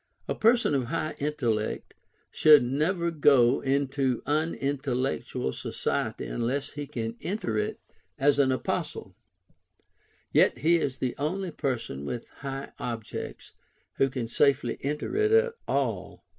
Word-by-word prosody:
A - - 0
person 230 -6 +3
of 135 -3 +1
high 155 +3 -2
intellect 120 -8 -1 0.4
should 150 -4 +7
never 165 +7 0
go 140 -5 +5
into 135 -2 0
unintellectual 135 - -1
society - - -2
unless 135 +5 -2
he 145 -1 -6
can 115 -2 -4
enter 200 +5 -2
it 215 +1 -2 0.4
as 145 0 +3
an 135 -2 +4
apostle; 130 - -3 1.2
yet - - +4
he 165 +7 +4
is 140 -5 -2
the 130 - -1
only 180 +5 -2
person 120 - -3
with 115 +10 -5
high 135 0 -5
objects 115 -3 -6 0.5
who 135 - +3
can 125 -3 -3
safely 135 0 +2
enter 150 - -3
it 425 +1 +3
at 455 +1 +4
all. - - -2
140 Hz, 130 wpm, -28 LUFS, 125-155 Hz, 1.2 s, should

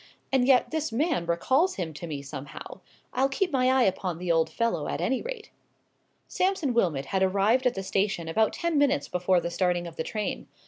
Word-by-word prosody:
And 260 -2 +3
yet 260 -2 +4
this 315 -3 -2
man 265 - 0
recalls 260 - +2
him 170 -4 -4
to 170 +3 -7
me 145 -3 -5
somehow. 140 0 -8 0.3
I'll 265 +2 +2
keep 355 +7 -1
my 255 -2 +2
eye 260 -1 +4
upon 185 -4 -1
the 175 0 -1
old 165 -1 +2
fellow, 230 -11 -1
at - - -3
any 235 +10 0
rate." 470 -3 -7 0.8
Sampson 365 -8 0
Wilmot 165 -12 +1
had 190 +5 -1
arrived 200 +7 +3
at 245 - 0
the 195 - -4
station 195 -3 -1
about 220 +7 +2
ten 340 -3 0
minutes 285 0 +2
before 180 0 +2
the 170 - -4
starting 175 0 0
of 170 -1 -9
the - - -1
train. 210 +3 -4
200 Hz, 200 wpm, -27 LUFS, 170-270 Hz, 0.8 s, yet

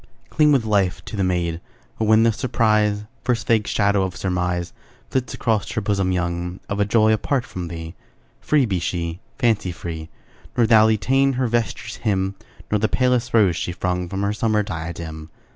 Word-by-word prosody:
Cling 150 -1 +4
with 130 -6 +3
life 100 -4 +1
to - - -6
the 100 - 0
maid; 85 -2 -1 0.4
But - - +1
when 110 +1 +5
the 115 - +4
surprise, 105 -3 +1 0.2
First 120 -2 0
vague 110 -3 +2
shadow 100 -1 +2
of 95 -1 -2
surmise 90 -2 -2 0.4
Flits 125 -4 -1
across 110 -4 0
her 110 - -1
bosom 100 -2 0
young, 90 0 -2
Of 100 0 -3
a 100 - +3
joy 110 +1 +4
apart 125 +3 0
from 90 -8 -6
thee, 80 -1 -7 0.5
Free 150 -3 +2
be 95 -5 -1
she, 85 0 -3 0.2
fancy 110 -6 +1
free; 80 -2 -7 0.5
Nor 120 - +5
thou 110 -1 +6
detain 135 +5 +2
her 130 0 0
vesture's 115 -2 -2
hem, 95 -3 0 0.4
Nor 105 - +2
the 110 - +1
palest 125 -2 +1
rose 100 -6 +4
she 90 - -3
flung 90 0 -2
From 95 +1 -3
her 100 +1 0
summer 110 -1 +1
diadem. 80 -3 -6
100 Hz, 180 wpm, -22 LUFS, 90-115 Hz, 0.5 s, thou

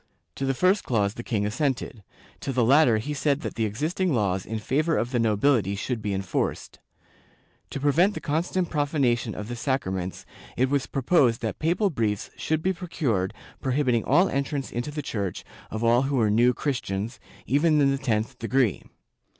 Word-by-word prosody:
To 135 - -3
the 135 - +1
first 185 +7 +3
clause 105 -4 0
the 120 - -6
king 105 -4 -1
assented; 125 -1 -2 0.4
to 135 - -3
the 125 -3 +2
latter 135 -2 +5
he 145 +8 -3
said 145 0 0
that - - -4
the 110 - -1
existing 155 - -1
laws 95 -4 0
in 110 - -3
favor 155 +9 0
of 120 +2 -1
the 125 - +1
nobility 110 -2 +2
should 110 +3 -3
be 105 - -2
enforced. 95 -1 -3 0.9
To - - -5
prevent 165 +9 +3
the - - -3
constant 170 +3 -1
profanation 140 -7 0
of 105 - -6
the 120 - -4
sacraments 95 -8 -2 0.3
it 130 +2 +2
was 140 -2 +1
proposed 135 -3 +2
that 110 - -3
papal 180 +5 +1
briefs 110 -7 -1
should 160 0 -1
be 190 - +2
procured 140 - -1 0.3
prohibiting 130 -3 +1
all 185 +2 +4
entrance 140 0 -2
into 120 +4 -3
the 150 0 -5
Church 100 -8 -3 0.3
of 110 +2 -4
all 120 +2 +4
who 135 +1 -1
were 110 -5 +3
New 120 +4 +4
Christians, 115 -5 -3 0.3
even 150 +3 +3
in 140 -1 +4
the 135 - -1
tenth 120 -1 -1
degree. 120 -2 +1
130 Hz, 180 wpm, -26 LUFS, 110-145 Hz, 0.9 s, latter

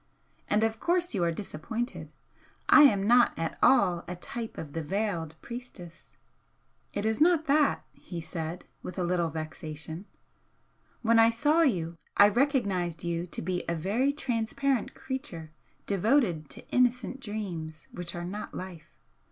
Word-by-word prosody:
And 210 +1 +3
of 225 0 0
course 350 +2 +1
you 190 -5 0
are 170 - +2
disappointed. 210 +7 -5 0.6
I - - +9
am 200 -7 +4
not 240 +2 +5
at 165 -1 -3
all 180 -9 +4
a 180 - -4
type 225 +6 -6
of 145 -3 -7
the 165 - -2
veiled 170 -2 -2
priestess." 235 -9 -9 0.8
"It 205 - -3
is 220 +4 0
not 330 -1 +5
that," 290 0 +3
he 175 - -8
said, 165 +1 -5 0.2
with 180 - -7
a 185 - 0
little 175 -1 +1
vexation 155 +2 -6 1.0
"When 230 0 +5
I 225 0 +7
saw 295 +8 +3
you 170 - +1 0.2
I 205 0 +8
recognised 200 - +1
you 170 0 -2
to - - -5
be 180 +1 -1
a 170 - 0
very 215 - +1
transparent 265 -1 -1
creature, 170 - -6 0.3
devoted 200 - +2
to - - -11
innocent 250 +1 +1
dreams 180 -9 -5
which 175 -1 -5
are 175 0 -4
not 205 +4 -6
life. 180 -4 -8
200 Hz, 150 wpm, -29 LUFS, 170-240 Hz, 1.0 s, I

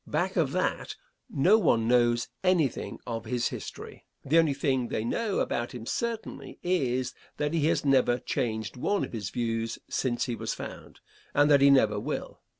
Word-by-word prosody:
Back - - -1
of - - +2
that - - -1 0.3
no 190 +11 +4
one 115 - +2
knows 120 0 +3 0.2
anything 180 -7 +1
of 115 -2 -4
his 120 +1 0
history. - - -8 0.2
The 155 +5 +4
only 155 -4 +2
thing 130 -3 0
they 110 - -2
know 215 - -1
about 120 +1 -1
him 115 -2 -7
certainly, 230 - -4
is, 130 -8 0 0.2
that 150 +1 -1
he 155 -2 +2
has 160 - +1
never 130 -3 +4
changed 110 -2 -3
one 200 +10 0
of - - -6
his 105 -5 -4
views 115 -1 -2
since 120 -2 0
he 120 - -3
was 110 0 -3
found, - - -9 0.3
and 145 +1 +5
that 140 -1 +6
he 140 - +7
never 110 -7 +4
will. - - -5
125 Hz, 175 wpm, -28 LUFS, 120-150 Hz, 0.3 s, he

